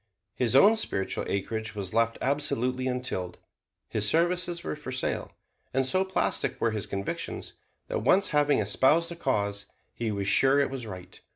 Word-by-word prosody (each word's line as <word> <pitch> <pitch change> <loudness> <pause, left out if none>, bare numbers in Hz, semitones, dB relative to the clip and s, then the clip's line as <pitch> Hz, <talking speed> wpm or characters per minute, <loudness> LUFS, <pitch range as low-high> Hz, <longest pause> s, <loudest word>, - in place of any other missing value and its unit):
His 125 0 +1
own 205 +11 +7
spiritual 95 - -2
acreage 110 +3 -3
was 100 -2 -5
left 115 0 +2
absolutely 130 -2 0
untilled. 125 -8 -3 0.5
His 105 -1 0
services 175 +1 +1
were - - -3
for 150 -3 -8
sale; 125 - -2 0.4
and 135 0 +3
so 185 +8 +3
plastic 190 0 -1
were 115 - +1
his 105 -2 -4
convictions 100 0 -4 0.3
that - - -2
once 190 - +4
having 145 -2 +3
espoused 135 +11 +2
a - - -5
cause 100 -9 -1 0.3
he 115 -2 -2
was 100 -1 -2
sure 135 +6 +5
it 140 - +1
was 130 -4 -5
right. 90 -3 -10
130 Hz, 165 wpm, -28 LUFS, 105-150 Hz, 0.5 s, own